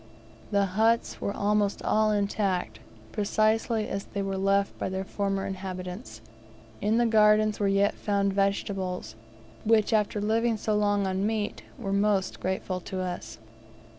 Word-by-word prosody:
The 200 -1 +2
huts 220 +5 +1
were - - -1
almost 205 0 0
all 215 0 +3
intact, 200 - 0 0.3
precisely 215 +1 +1
as 195 0 -4
they 200 0 -4
were 195 0 -2
left 195 +1 +1
by - - -2
their 190 0 -3
former 195 0 -2
inhabitants. 185 - -6 0.6
In 215 +2 +2
the 240 - +3
gardens 215 -1 +4
were 205 - +2
yet 195 +1 +3
found 200 -1 0
vegetables, 195 - -1 0.5
which, 220 0 +3
after 210 -1 +1
living 225 +2 +1
so 215 0 -1
long 205 -1 +2
on 190 +2 0
meat, 215 -2 -2 0.2
were 200 -6 -3
most 200 -1 +1
grateful 185 0 -2
to 185 +1 -6
us. 175 -11 -5
200 Hz, 145 wpm, -27 LUFS, 190-215 Hz, 0.6 s, gardens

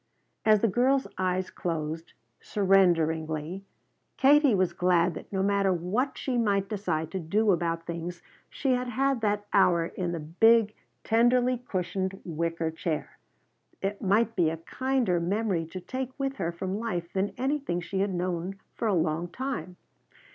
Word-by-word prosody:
As 215 -2 +5
the 230 - +4
girl's 260 +6 +2
eyes 185 0 0
closed, 165 -1 -4 0.3
surrenderingly, 165 -4 +1 0.6
Katie 285 -3 +5
was 185 -2 +1
glad 180 -1 +2
that - - -10
no 190 -1 0
matter 200 -1 +2
what 190 +10 -1
she 250 -3 -1
might 200 -3 +1
decide 190 -7 -2
to 190 - -2
do 205 +6 +2
about 165 -2 -1
things 170 +1 -5 0.3
she 270 - -1
had 250 0 +1
had 265 +1 0
that 205 -1 0
hour 175 -4 +4
in 175 +1 -3
the 170 - -3
big, 215 +8 +4 0.3
tenderly 245 +2 +3
cushioned 190 -3 -3
wicker 165 0 -2
chair. 160 -1 -4 0.6
It 200 +1 -3
might 220 +4 +2
be 170 -4 +3
a 165 - -4
kinder 245 +1 0
memory 185 -1 0
to 185 +3 -7
take 260 +7 -5
with 275 -1 -2
her 170 -4 -1
from 190 +4 -4
life 175 -7 -3
than 195 +1 -1
anything 270 -9 -1
she 190 +2 -4
had 200 0 +1
known 180 +1 -2 0.2
for 230 - -2
a 205 - +2
long 165 +1 0
time. 240 - -5
190 Hz, 155 wpm, -28 LUFS, 170-225 Hz, 0.6 s, As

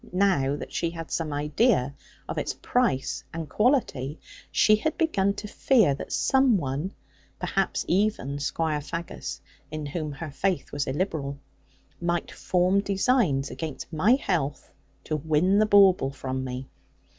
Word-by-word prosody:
Now 180 -8 +2
that - - -8
she 170 - 0
had 165 -1 -8
some 160 -2 -1
idea 145 - +2 0.3
of - - -3
its - - -3
price 235 - 0
and 165 -1 -5
quality, 160 - +1 0.3
she 215 0 +5
had 315 +9 -2
begun 200 - +1
to 210 - -6
fear 215 - +3
that 135 - -7
some 265 -4 +3
one, 145 +4 -3 0.4
perhaps - - -1
even 180 -8 0
Squire 150 +1 -1
Faggus 170 +3 -6 0.3
(in 155 -1 -5
whom 150 0 -4
her 150 +2 -6
faith 185 +1 -1
was 145 0 -2
illiberal), 140 -2 -2 0.6
might 175 0 -1
form 185 +2 +2
designs 195 - +1
against 160 +1 -6
my 185 +10 +4
health, 155 - -2 0.3
to 155 - -2
win 160 +6 +2
the 215 - +4
bauble 195 -8 +6
from 130 -1 -4
me. 130 0 -5
165 Hz, 145 wpm, -26 LUFS, 145-200 Hz, 0.6 s, bauble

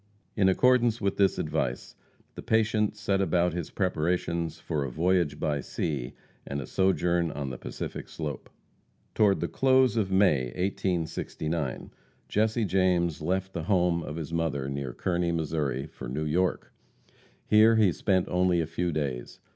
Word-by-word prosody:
In 95 -2 +4
accordance 120 +2 +3
with 100 -2 -1
this 100 -1 +3
advice, 65 -2 -2 0.4
the - - -8
patient 110 -1 +1
set 100 -3 0
about 90 -1 +2
his 85 -3 -4
preparations 85 -2 -1
for 75 -3 -2
a 70 - -3
voyage 85 +3 +1
by 75 -2 -1
sea, 70 -2 -3 0.3
and 70 - -4
a 70 - -5
sojourn 90 -2 +1
on 70 -3 -4
the 60 - -6
Pacific - - -6
slope. 75 -5 -6 0.6
Toward 100 -3 +3
the - - 0
close 130 -3 +3
of 100 -4 0
May, 95 -9 +3
1869, 85 -5 -2 0.4
Jesse 110 +2 +1
James 90 -4 +1
left 95 +4 -1
the 85 -3 -4
home 90 -3 +2
of 75 - -6
his 80 0 -6
mother 80 -5 -1
near 70 -2 -4
Kearney, 85 +4 -1
Missouri, 75 -4 -1
for - - -9
New 75 +5 -2
York. 90 +4 -1 0.7
Here 110 +1 +6
he 105 -4 +4
spent 95 +1 +1
only 90 -1 +2
a 80 - +1
few 85 +2 -2
days. 70 -6 -4
85 Hz, 155 wpm, -28 LUFS, 75-95 Hz, 0.7 s, Here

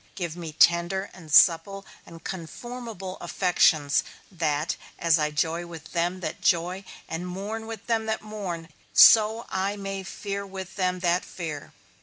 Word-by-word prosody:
Give 170 -4 -4
me 170 -3 -6
tender 175 +5 +3
and 160 -4 -12
supple 185 +6 +5 0.2
and 165 -1 -12
conformable 195 +2 -7
affections, 155 -6 +2 0.3
that 155 -3 -1 0.2
as 170 -1 +3
I 150 0 +1
joy 165 +3 -1
with 160 -2 -10
them 175 +2 -1
that - - -5
joy, 180 +3 +1 0.2
and 175 +2 -4
mourn 205 +5 -5
with 225 -1 -7
them 225 -2 0
that 220 0 -2
mourn, 190 -6 -6 0.2
so 220 +1 +7
I 190 +2 -1
may 195 -1 -5
fear 200 +1 -5
with 190 -1 -8
them 185 -2 -1
that 175 0 +2
fear. 155 -5 -7
180 Hz, 150 wpm, -26 LUFS, 165-200 Hz, 0.3 s, so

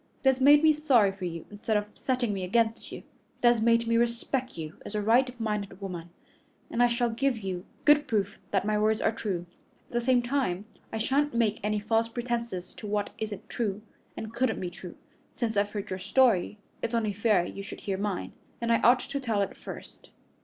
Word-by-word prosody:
It 265 - +6
has 265 0 +1
made 290 +3 +7
me 315 -1 +7
sorry 265 -10 +4
for 195 -1 -6
you 170 -2 -5
instead 210 +1 0
of 210 - -1
setting 250 -4 -1
me 190 -2 -3
against 225 +4 0
you. - - -8 0.4
It - - +7
has 240 -2 +4
made 230 +1 +4
me 230 0 +2
respect 240 +1 -1
you 160 0 -7
as 215 - -7
a 210 - +1
right 245 +3 +3
minded 210 -3 -3
woman, 175 -4 -6 0.6
and 235 - 0
I 245 - +7
shall 235 0 +1
give 265 +2 0
you 190 -4 -5 0.2
good 295 0 +5
proof 205 -2 -1
that 195 -1 +1
my 210 0 +1
words 215 +1 +2
are - - +2
true. 190 -6 -3 0.4
At - - -18
the 240 - +1
same 245 0 +3
time, 240 -7 -1 0.3
I - - -3
shan't 275 +4 +1
make 220 -3 +2
any 210 0 0
false 225 +2 +1
pretenses 235 -6 -3
to 215 - -7
what 205 0 -1
isn't 210 -3 -5
true 210 -3 -2 0.3
and 220 0 -6
couldn't 260 +2 0
be 180 -1 -4
true. 180 0 -9 0.4
Since 230 -3 -1
I've 205 0 +2
heard 205 -2 -5
your 185 - -3
story, 210 -1 +3 0.2
it's 230 - -1
only 220 -3 0
fair 205 -3 +2
you 195 - -6
should 200 - -8
hear 195 -1 -2
mine, 200 -2 -2 0.3
and 235 0 0
I 230 - +4
ought 250 +1 +6
to 275 +2 -4
tell 225 -6 0
it - - -5
first." - - -10
220 Hz, 215 wpm, -28 LUFS, 200-240 Hz, 0.6 s, made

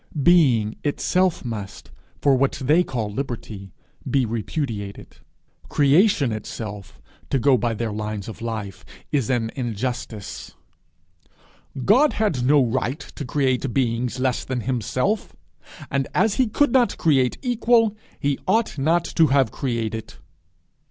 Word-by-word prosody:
Being 130 -12 +4
itself 180 +3 +1
must, 105 -4 -6 0.3
for 140 -2 +5
what 135 +1 +2
they 150 +6 +2
call 115 -9 -3
liberty, 110 -6 -5 0.4
be 135 -3 +2
repudiated! 110 -2 -4 0.5
Creation 145 - +3
itself, 105 -2 -7 0.3
to - - +1
go 135 +1 +4
by 120 -1 0
their 115 0 -2
lines 105 -1 -4
of 110 - -8
life, 110 -4 -5 0.3
is 140 -7 0
an 115 -3 0
injustice! 120 -3 -5 1.3
God 270 +9 +5
had 185 - 0
no 140 +1 +4
right 130 +4 -1
to - - -6
create 130 -2 0
beings 125 -1 0
less 130 -1 0
than 130 -2 -3
himself; 130 - -1 0.6
and 140 -1 0
as 220 -2 +3
he 260 - +3
could 290 +5 +2
not 250 -2 +3
create 135 -6 +2
equal, 235 -3 +3 0.2
he 140 -1 0
ought 225 -9 +1
not 165 +5 +2
to 160 - +3
have 135 -4 +3
created! 115 -4 -3
130 Hz, 130 wpm, -23 LUFS, 115-150 Hz, 1.3 s, for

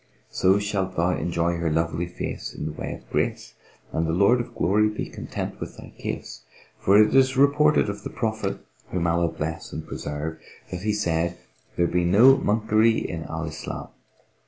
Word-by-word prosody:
So 95 +2 +3
shalt 100 -2 -2
thou 85 +2 +3
enjoy 85 -1 0
her 85 -1 0
lovely 80 +2 0
face 90 - -5
in - - -5
the 80 - -2
way 75 - -5
of - - -16
grace, - - -1 0.4
and 80 0 0
the 80 - 0
Lord 100 +7 +4
of 120 - -10
Glory 105 +4 +3
be 105 - -4
content - - -6
with - - -7
thy - - -12
case; - - -6 0.4
for 100 +2 +5
it 105 0 +5
is 130 0 +4
reported 145 0 +4
of 100 0 -4
the - - -4
Prophet 110 -4 -3 0.2
(whom 90 -2 -1
Allah 85 0 +2
bless 80 +1 -4
and 80 - -6
preserve!) 75 +2 -5 0.3
that 90 -1 -4
he 105 +2 0
said, 85 -4 0 0.4
'There 85 - +2
be 90 +1 +1
no 110 +10 +7
monkery 110 0 +2
in 80 -1 -4
Al 80 0 -4
Islam."' 75 -1 -6
90 Hz, 180 wpm, -25 LUFS, 85-105 Hz, 0.4 s, no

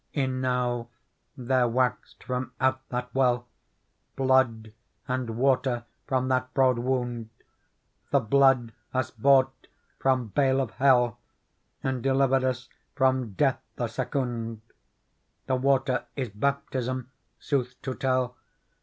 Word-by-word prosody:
" - - -45
Enow 125 -2 -1 0.5
there 125 -1 +2
waxed 125 +1 -1
from 125 0 -3
out 130 0 +2
that 125 0 -4
well 125 -2 +2 0.7
Blood 130 -5 +2 0.3
and 125 -2 -2
water 130 -2 +1 0.2
from 130 -1 +1
that 130 0 0
broad 130 -3 +4
wound! 120 -2 -2 0.8
The 140 - +4
blood 130 -1 +3 0.2
us 130 - 0
bought 130 +2 +3 0.3
from 130 -4 +1
bale 135 +3 +2
of 130 -5 -1
hell 125 -4 +3 0.6
And 130 -2 -1
delivered 135 0 +3
us 125 -2 -1 0.3
from 130 -5 +1
death - - +1
the - - -1
secounde: 115 -4 -3 0.8
The 130 - +1
water 130 -1 +1
is 130 -4 -2
baptism, 130 +2 -2 0.3
sooth 125 -3 -2
to 130 - -2
tell. 130 -1 0
130 Hz, 120 wpm, -27 LUFS, 120-130 Hz, 0.8 s, broad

